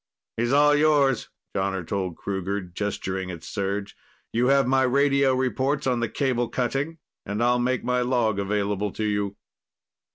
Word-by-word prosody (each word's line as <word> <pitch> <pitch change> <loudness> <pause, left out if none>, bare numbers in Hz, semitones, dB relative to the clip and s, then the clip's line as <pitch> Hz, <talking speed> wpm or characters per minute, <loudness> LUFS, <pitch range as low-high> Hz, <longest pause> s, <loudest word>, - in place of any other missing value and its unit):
"He's 120 +2 0
all 145 +1 +5
yours," 145 -4 +3 0.3
Jonner 95 -2 -1
told 95 -4 -2
Kruger, 100 0 -2
gesturing 95 0 -4
at 85 -3 -7
Serj. 100 +2 -3 0.4
"You 120 +2 +2
have 140 0 +4
my 135 +1 +3
radio 140 +1 +3
reports 130 +3 0
on 125 -2 +1
the 120 - -1
cable 125 -4 0
cutting, 135 +7 -2 0.3
and 105 +3 -2
I'll 125 0 +3
make 125 +1 0
my 125 0 +1
log 120 -5 +1
available 100 0 -1
to 110 - -3
you." 105 -1 -1
120 Hz, 155 wpm, -25 LUFS, 100-135 Hz, 0.4 s, all